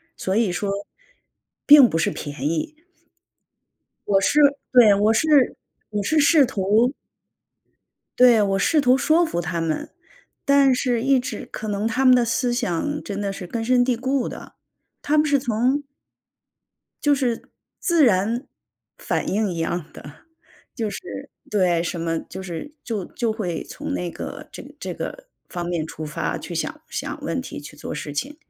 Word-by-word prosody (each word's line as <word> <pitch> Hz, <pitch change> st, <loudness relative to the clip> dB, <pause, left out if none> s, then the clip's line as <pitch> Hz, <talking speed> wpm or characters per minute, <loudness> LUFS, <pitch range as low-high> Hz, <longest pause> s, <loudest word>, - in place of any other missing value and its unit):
所 190 Hz, -, -3 dB
以 215 Hz, -3 st, +2 dB
说 200 Hz, +2 st, -2 dB, 0.9 s
并 285 Hz, -4 st, +9 dB
不 -, -, -1 dB
是 160 Hz, -, +1 dB
便 145 Hz, 0 st, -4 dB
宜。 300 Hz, -, -3 dB, 1.3 s
我 195 Hz, -1 st, +4 dB
是 240 Hz, +10 st, +2 dB, 0.3 s
对， 235 Hz, -5 st, +7 dB
我 210 Hz, +2 st, +3 dB
是 315 Hz, -, +1 dB, 0.6 s
我 205 Hz, -1 st, -1 dB
是 310 Hz, +8 st, +2 dB
试 295 Hz, -1 st, +5 dB
图 215 Hz, +4 st, +2 dB, 1.3 s
对， 245 Hz, -3 st, +7 dB
我 195 Hz, -1 st, +1 dB
试 305 Hz, +5 st, +3 dB
图 255 Hz, -1 st, +4 dB
说 315 Hz, +5 st, +3 dB
服 175 Hz, -, -3 dB
他 175 Hz, -1 st, -2 dB
们， 160 Hz, -1 st, -2 dB, 0.6 s
但 280 Hz, -2 st, +5 dB
是 245 Hz, -2 st, 0 dB
一 270 Hz, +1 st, +3 dB
直 250 Hz, -, -6 dB
可 215 Hz, -, -6 dB
能 205 Hz, +1 st, -1 dB
他 255 Hz, +4 st, 0 dB
们 255 Hz, -, +8 dB
的 245 Hz, -1 st, +4 dB
思 245 Hz, +1 st, 0 dB
想 245 Hz, -, -2 dB
真 205 Hz, 0 st, -4 dB
的 200 Hz, -1 st, -2 dB
是 185 Hz, -2 st, -7 dB
根 225 Hz, +4 st, -3 dB
深 245 Hz, +1 st, +3 dB
蒂 250 Hz, -2 st, +1 dB
固 260 Hz, +1 st, -1 dB
的。 -, -, -9 dB, 0.5 s
他 305 Hz, +1 st, +1 dB
们 300 Hz, -, +4 dB
是 285 Hz, -2 st, +3 dB
从 255 Hz, +3 st, 0 dB, 1.2 s
就 290 Hz, -1 st, +4 dB
是 245 Hz, -4 st, -2 dB, 0.3 s
自 335 Hz, -5 st, +3 dB
然 225 Hz, +4 st, +1 dB, 0.5 s
反 -, -, -2 dB
应 205 Hz, -1 st, 0 dB
一 170 Hz, -, -5 dB
样 165 Hz, +1 st, -2 dB
的， 145 Hz, +1 st, -13 dB, 0.5 s
就 220 Hz, -2 st, -2 dB
是 360 Hz, -, -7 dB, 0.2 s
对， 180 Hz, -5 st, +2 dB
什 170 Hz, 0 st, -4 dB
么 165 Hz, 0 st, -1 dB
就 190 Hz, +2 st, -9 dB
是 185 Hz, -, -7 dB
就 210 Hz, -6 st, -3 dB
就 235 Hz, -2 st, -2 dB
会 180 Hz, -7 st, -3 dB
从 295 Hz, +1 st, -6 dB
那 180 Hz, -9 st, -3 dB
个 -, -, -8 dB
这 -, -, -10 dB, 0.2 s
这 -, -, -5 dB
个 -, -, -7 dB, 0.2 s
方 175 Hz, -1 st, -4 dB
面 170 Hz, -3 st, -2 dB
出 160 Hz, 0 st, -7 dB
发 150 Hz, -, -3 dB
去 -, -, -7 dB
想 -, -, -3 dB
想 -, -, -5 dB
问 -, -, -2 dB
题 -, -, -8 dB
去 -, -, -12 dB
做 -, -, -6 dB
事 145 Hz, -, -6 dB
情。 275 Hz, -, -4 dB
225 Hz, 180 characters per minute, -22 LUFS, 185-270 Hz, 1.3 s, 并